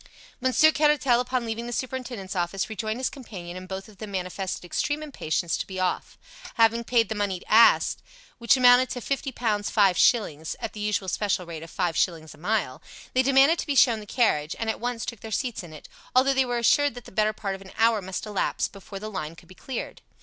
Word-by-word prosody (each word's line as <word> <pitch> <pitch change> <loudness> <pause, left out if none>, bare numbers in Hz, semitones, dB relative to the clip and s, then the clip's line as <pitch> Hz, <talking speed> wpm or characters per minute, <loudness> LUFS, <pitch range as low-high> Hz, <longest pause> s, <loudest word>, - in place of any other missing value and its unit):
Monsieur 260 +5 +4
Caratal, 295 -5 +3
upon 250 -1 -1
leaving 230 +1 -4
the - - -5
superintendent's 245 -6 -4
office, 185 +4 -2
rejoined 220 +1 -3
his 260 - 0
companion, 185 -10 -9
and 185 0 -8
both 190 +1 -6
of 205 -3 -18
them 215 - -7
manifested 185 -1 -4
extreme 290 - -2
impatience 170 - -2
to - - -4
be 190 -1 -6
off. 185 -1 -2 0.4
Having 230 +1 +3
paid 230 -2 +3
the - - -3
money 200 -4 -2
asked, 230 +2 +5 0.4
which 235 +2 +4
amounted 250 0 +6
to 250 - -4
fifty 275 +2 -3
pounds 215 -4 -1
five 200 -4 +4
shillings, 160 - +2
at - - -5
the 215 - -9
usual 210 -2 -1
special 185 -1 -1
rate 165 -2 -7
of 165 - -10
five 175 -4 -1
shillings 160 -3 -1
a - - -18
mile, 180 -7 -1 0.3
they 255 - +4
demanded 275 +5 +4
to - - -3
be 285 - 0
shown 240 -4 +5
the 210 - -11
carriage, 160 - +1
and 225 -1 -1
at - - -8
once 240 -1 -3
took 235 - -6
their 220 - -8
seats 240 +1 -2
in 175 -3 -11
it, 155 - -12 0.3
although 265 +2 +5
they 265 -1 +2
were 245 -1 -1
assured 280 +3 +3
that 245 -3 -10
the - - -12
better 215 +2 +2
part 200 -2 -4
of 195 - -8
an 190 - -12
hour 225 -1 +3
must 190 +2 -5
elapse 210 -2 -1
before 195 0 -10
the 210 +2 -6
line 165 -5 -5
could - - -17
be 185 - -14
cleared. 250 +5 -6
220 Hz, 225 wpm, -26 LUFS, 190-245 Hz, 0.4 s, amounted